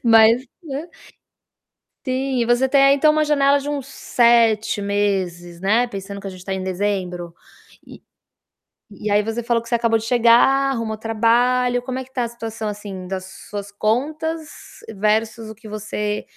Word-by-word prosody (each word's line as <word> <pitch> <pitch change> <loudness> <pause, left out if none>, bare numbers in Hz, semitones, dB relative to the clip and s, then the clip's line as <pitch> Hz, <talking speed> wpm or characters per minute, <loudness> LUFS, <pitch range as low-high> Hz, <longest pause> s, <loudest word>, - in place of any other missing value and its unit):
Mas 230 +2 +5 0.2
né. 300 +2 -6 1.2
Sim. 260 0 -1
E 235 - +1
você 240 +2 +2
tem 275 0 +4
aí 275 0 +6
então 305 +2 +4
uma 305 0 +2
janela 285 -1 +3
de 285 +1 -6
uns 280 -3 -3
7 230 -5 +2
meses, 190 -4 -2
né, 215 +6 +2
pensando 200 -1 -7
que 195 - -9
a - - -4
gente 185 -1 -12
tá 195 - -4
em 190 - -4
dezembro. 185 -2 -3 0.5
E - - -13 0.9
e 210 +1 -5
aí 205 +1 +3
você 225 +2 -3
falou 235 0 0
que 235 - -14
você - - -4
acabou 230 -1 +2
de 220 - -6
chegar, 245 +3 +4
arrumou 230 -4 -3
trabalho. 240 +3 +2
Como 255 +1 -5
é 260 - -4
que 260 +1 -21
tá 250 - -1
a - - -1
situação, 225 -2 -5
assim, 200 -3 -7
das 185 0 -4 0.2
suas 205 -1 -6
contas 300 +10 -1 0.5
versus 220 +2 0
o 220 - -9
que 220 +1 -14
você 210 0 -3
225 Hz, 175 wpm, -21 LUFS, 205-255 Hz, 1.2 s, aí